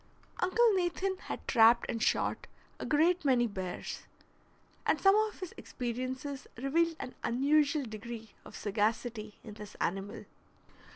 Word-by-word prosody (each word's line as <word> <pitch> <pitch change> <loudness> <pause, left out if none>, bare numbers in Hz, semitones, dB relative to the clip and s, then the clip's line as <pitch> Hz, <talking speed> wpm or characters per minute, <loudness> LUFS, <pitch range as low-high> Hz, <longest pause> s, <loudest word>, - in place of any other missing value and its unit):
Uncle 440 +5 +4
Nathan 375 +1 0
had - - -6
trapped 230 0 +6
and 230 - -3
shot - - +1 0.3
a - - -4
great 335 +4 +3
many 255 -4 +4
bears, 190 -5 -5 0.8
and - - +2
some 390 0 +6
of 430 0 +1
his 370 - -6
experiences 260 +3 -4
revealed 325 +6 +1
an 250 - -6
unusual 285 +4 +3
degree 225 0 -7
of - - -12
sagacity 215 +1 -1
in 215 - -9
this 210 -1 -10
animal. 195 +4 -3
255 Hz, 130 wpm, -32 LUFS, 220-330 Hz, 0.8 s, trapped